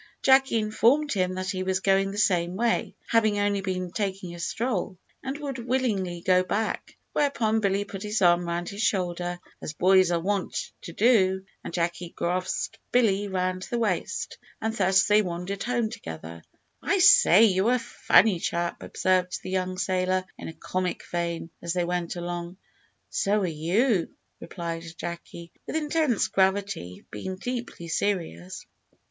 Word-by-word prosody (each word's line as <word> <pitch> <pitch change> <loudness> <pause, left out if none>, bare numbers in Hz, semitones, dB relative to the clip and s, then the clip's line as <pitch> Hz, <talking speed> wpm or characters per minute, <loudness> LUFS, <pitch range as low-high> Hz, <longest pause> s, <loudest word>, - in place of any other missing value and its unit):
Jacky 265 -2 +5
informed 235 +7 +2
him 185 -2 0
that 185 0 -2
he 185 -2 -3
was 185 0 0
going 195 0 +2
the 200 - -6
same 180 -4 +2
way, 230 +3 0
having 220 -2 +3
only 205 -1 +1
been 185 -2 -3
taking 190 -3 -3
a 175 - -9
stroll, 210 0 -2 0.2
and 270 +1 -4
would 280 -3 -5
willingly 225 -8 -1
go 185 +1 +4
back: 210 +4 -3 0.2
whereupon 230 -7 +1
Billy 200 -1 +1
put 195 -1 -8
his 210 +1 -1
arm 175 -1 +4
round 170 +1 -2
his 200 +2 -5
shoulder, 175 -4 -1 0.2
as 150 - -5
boys 185 +2 +4
are 170 -1 +1
wont 195 +2 -2
to - - -8
do, 190 -3 +3 0.2
and - - -6
Jacky 170 0 -2
grasped 180 +2 -2
Billy 205 -5 +3
round 185 -1 -2
the 240 - -1
waist, 210 -7 -2 0.2
and 220 0 -2
thus 190 -2 +4
they 210 +2 +4
wandered 180 +1 -4
home 240 -2 0
together. 80 +1 -8 0.4
"I 400 - +1
say, 360 - +7
you're 205 +2 +4
a - - +2
funny 225 -4 +3
chap," 170 +1 -2
observed 185 -1 0
the 185 - -5
young 185 -1 -1
sailor, 185 0 0
in - - -8
a 165 - -6
comic 185 +2 -3
vein, 170 -1 -2
as 170 0 -2
they 180 -1 0
went 175 -1 -2
along. 175 +1 -5 0.5
"So 205 +1 +1
are - - +1
you," 175 - +1 0.3
replied 170 -1 -6
Jacky, 170 0 -7 0.2
with - - -4
intense 300 -6 +1
gravity, 190 - 0
being 185 - -5
deeply 235 -4 -5
serious. 165 - -2
190 Hz, 160 wpm, -26 LUFS, 175-215 Hz, 0.5 s, say